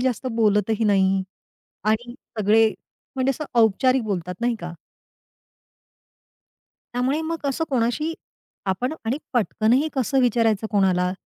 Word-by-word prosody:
जास्त 255 0 -1
बोलतही 215 0 +2
नाही 195 -2 +3 0.7
आणि 240 +3 0 0.2
सगळे 220 +2 +4 0.5
म्हणजे 260 +1 +2
असं 305 +3 -3 0.2
औपचारिक 255 +4 +3
बोलतात, 180 -4 -3
नाही 240 0 +1
का? 175 0 -6 2.2
त्यामुळे 260 +5 0
मग 330 +1 -2
कसं 280 +3 0
कोणाशी 260 +6 0 0.6
आपण 245 +10 -1
आणि 245 +6 -1
पटकनही 240 +4 +2
कसं 265 0 +1
विचारायचं 225 -3 +2
कोणाला 185 -3 +2
230 Hz, 110 wpm, -23 LUFS, 205-260 Hz, 2.2 s, सगळे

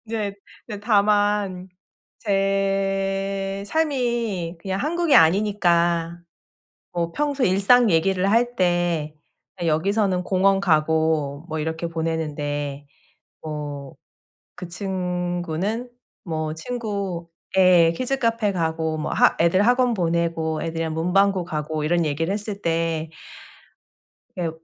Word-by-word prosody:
인제 215 -3 -3 0.3
이제 210 -3 -6
다만 205 -3 +1 0.5
제 195 -1 -1
삶이 235 - -1
그냥 190 +1 -3
한국이 330 +3 +2
아니니까 170 -2 +3 0.8
뭐 170 -1 -2
평소에 285 -2 0
일상 205 +5 +5
얘기를 185 +3 +2
할 240 +2 +2
때 175 -4 0 0.5
여기서는 185 +4 +1
공원 195 +1 +2
가고 155 -3 +1
뭐 160 - -3
이렇게 160 +2 -3
보내는데 145 -3 -3 0.6
뭐 145 -3 -6 0.7
그 180 - -6
친구는 180 +3 -3 0.4
뭐 155 -2 -3
친구 200 -4 -4 0.3
예 180 -3 +6
키즈카페 230 0 0
가고 160 -2 -1
뭐 155 - -3
하 - - +4
애들 170 +3 +3
학원 250 0 +3
보내고 165 -4 -1
애들이랑 165 -1 -3
문방구 185 +2 +2
가고 155 -1 -3
이런 170 +2 +1
얘기를 165 +5 -1
했을 205 -1 -4
때 165 -1 -1 1.3
예 170 -2 0
180 Hz, 210 characters per minute, -23 LUFS, 160-200 Hz, 1.3 s, 예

